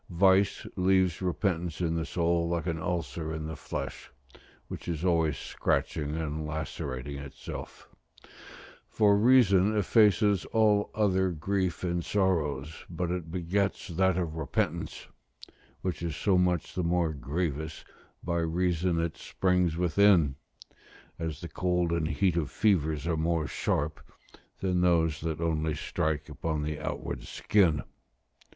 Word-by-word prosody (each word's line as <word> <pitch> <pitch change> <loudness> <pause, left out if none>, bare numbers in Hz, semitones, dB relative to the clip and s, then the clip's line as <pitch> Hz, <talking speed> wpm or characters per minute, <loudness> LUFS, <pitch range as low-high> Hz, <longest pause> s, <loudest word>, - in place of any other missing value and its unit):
Vice 95 +3 +3
leaves 95 -2 +2
repentance 90 -2 -1
in 85 -2 0
the 80 -1 -2
soul, 85 -1 +1
like 85 -1 -1
an 85 -2 -2
ulcer 85 -1 -3
in 80 -1 -4
the 80 0 -5
flesh, 75 - -6 0.6
which - - -8
is 85 0 -2
always 80 -5 +2
scratching 75 +1 -1
and 80 -1 -3
lacerating 75 -3 -4
itself: 70 -1 -8 1.0
for 105 -2 +4
reason 105 -3 +5
effaces 105 -2 +4
all 105 -2 +2
other 95 -3 +2
grief 90 +2 -1
and 85 -1 -1
sorrows, 80 -7 -1
but 85 0 -2
it 90 -3 -3
begets 95 +4 -1
that 95 +1 +2
of 85 -4 -1
repentance, 80 - -2 0.8
which 90 -2 -3
is 85 -4 -3
so 100 +2 +2
much 90 -3 +1
the 90 - -1
more 85 -1 +1
grievous, 75 +1 -3 0.4
by 85 -1 -1
reason 85 +1 0
it 85 -1 -2
springs 90 -3 0
within, 90 -3 +4 0.9
as 80 -2 -4
the 85 - -5
cold 90 -1 0
and 85 -2 0
heat 85 +3 +1
of 80 -4 0
fevers 80 -8 +1
are 85 -1 0
more 80 0 0
sharp 75 +1 -1 0.6
than 90 -2 +1
those 80 -4 +2
that 80 -1 -3
only 80 -2 0
strike 75 0 -2
upon 75 0 -3
the 75 0 -3
outward - - -4
skin. 85 -9 +2
85 Hz, 135 wpm, -29 LUFS, 80-95 Hz, 1.0 s, reason